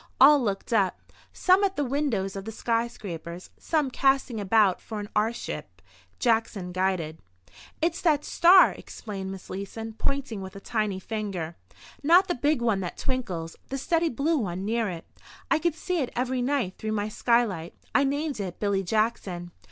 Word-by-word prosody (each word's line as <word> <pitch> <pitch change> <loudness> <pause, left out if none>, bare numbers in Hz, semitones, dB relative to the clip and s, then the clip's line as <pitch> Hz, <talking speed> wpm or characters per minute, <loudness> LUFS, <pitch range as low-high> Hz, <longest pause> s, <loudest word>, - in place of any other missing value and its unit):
All 285 +2 +8
looked 205 0 -2
up—some 295 - +1
at 390 -1 +1
the 290 - 0
windows 245 -8 -1
of 195 +3 -5
skyscrapers, 205 -7 -3
some 300 -5 0
casting 270 -3 +2
about 205 -1 +3
for 220 -2 -6
an 205 - -5
airship, 220 +3 -2 0.4
Jackson 220 -6 0
guided. 180 -4 -1 0.6
"It's 335 0 +1
that 300 -4 +2
star," 360 +2 +7
explained 195 -3 -7
Miss 195 -1 -9
Leeson, 220 +4 -6
pointing 275 -7 -2
with 190 +1 -8
a - - -7
tiny 210 -3 -1
finger. 190 -6 -4 0.5
"Not 345 +6 +6
the 355 - +1
big 290 -2 +1
one 225 -4 +2
that 180 -2 -5
twinkles—the 235 -2 -4
steady 330 +4 +1
blue 295 +5 +1
one 190 -3 -3
near 225 0 0
it. 170 -2 -7 0.5
I - - +4
can 340 0 +1
see 355 +2 -2
it 255 - -2
every 255 +1 0
night 245 -7 -1
through 215 0 -2
my 205 -1 -1
skylight. 215 -7 +1 0.2
I 280 - +5
named 285 -1 -1
it 185 -3 -5
Billy 200 -2 +1
Jackson." 190 -3 -1
225 Hz, 160 wpm, -27 LUFS, 195-275 Hz, 0.6 s, All